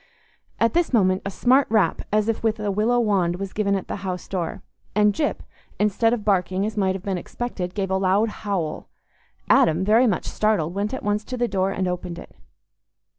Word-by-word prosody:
At 230 - +2
this 345 0 +1
moment 185 -4 +3
a - - -1
smart 255 +7 +3
rap, 215 -2 +2
as 210 0 +2
if 225 - -1
with 220 -1 0
a 210 -1 -1
willow 220 +5 +2
wand, 195 -6 +1
was 195 +1 -6
given 200 -2 +1
at 195 - -4
the - - -4
house 185 -2 -5
door, 175 -4 -4 0.3
and 210 0 +4
Gyp, 295 - -1 0.4
instead 210 +2 +2
of 235 -4 -2
barking, 190 -1 +1
as 215 - -4
might 190 -3 +1
have 190 - -7
been 190 -3 -2
expected, 185 -3 -5
gave 195 -2 -2
a 190 - +2
loud 195 +4 +2
howl. 190 -7 -3 0.6
Adam, 165 +4 +4
very 225 +5 +5
much 205 - 0
startled, 205 -7 0
went 200 +2 -2
at 260 - -5
once 205 +1 0
to 255 - -5
the 240 0 +1
door 195 -2 0
and 190 -1 -2
opened 180 -1 -4
it. - - -11
200 Hz, 205 wpm, -23 LUFS, 185-220 Hz, 0.6 s, very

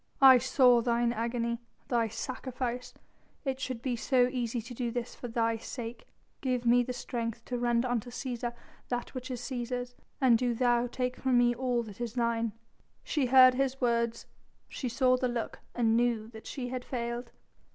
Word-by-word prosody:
"I 265 -2 +9
saw 250 -1 +5
Thine 235 0 +1
agony, 235 +1 -1 0.3
Thy 235 -2 +2
sacrifice; 250 +1 -4 0.5
it 265 -1 -1
should 255 -3 -4
be 255 -3 0
so 245 +1 +3
easy 240 -2 -2
to 235 +3 -8
do 240 0 -2
this 240 0 -4
for 245 - -7
Thy 230 -1 0
sake. 230 0 -7 0.3
Give 250 -3 -1
me 240 +1 +5
the 250 +1 -3
strength 235 -2 -4
to 245 -1 -3
render 240 0 +2
unto 245 -1 -1
Cæsar 240 -1 -4 0.3
that 245 -1 -3
which 255 -1 -6
is 250 -2 -4
Cæsar's, 245 0 -4 0.3
and 245 -4 +5
do 245 -1 0
Thou 240 0 +2
take 250 +1 -2
from 260 -2 +2
me 240 0 +4
all 245 -1 0
that 210 0 -10
is 235 -2 -3
Thine." 230 -2 0 0.5
She 290 -5 0
heard 255 0 +8
his 270 0 0
words, 235 -2 0 0.4
she 255 - -4
saw 255 +1 +3
the 255 0 0
look 240 -2 -3 0.2
and 225 -2 +3
knew 235 -2 +1
that 220 -1 -11
she 250 -3 -4
had 250 0 -4
failed. 235 -1 -4
245 Hz, 180 wpm, -30 LUFS, 235-255 Hz, 0.5 s, I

